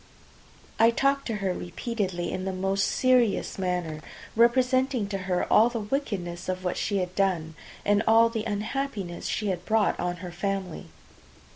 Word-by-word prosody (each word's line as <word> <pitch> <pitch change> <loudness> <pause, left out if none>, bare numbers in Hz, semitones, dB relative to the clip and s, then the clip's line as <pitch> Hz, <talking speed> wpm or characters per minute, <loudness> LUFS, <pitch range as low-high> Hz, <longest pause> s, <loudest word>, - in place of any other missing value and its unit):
I 225 - +7
talked 275 +3 +1
to 225 - -2
her 185 - +1
repeatedly 185 -1 -3
in 185 0 -3
the 190 - -1
most 195 +1 0
serious 250 -6 +2
manner, 180 -4 -2 0.3
representing 255 +1 +3
to 195 -1 -2
her 180 -1 +1 0.2
the 235 -1 -3
wickedness 200 -8 -3
of 185 0 -2
what 180 - -1
she 200 - -1
had 180 -1 -2
done, 180 -5 0 0.3
and 205 0 +3
all 225 +1 +6
the 225 -1 -3
unhappiness 210 -3 -3
she 210 -2 -1
had 180 -2 -2
brought 220 -1 +1
on 175 0 -1
her 175 - -6
family. 190 - -3
200 Hz, 155 wpm, -27 LUFS, 180-230 Hz, 0.3 s, I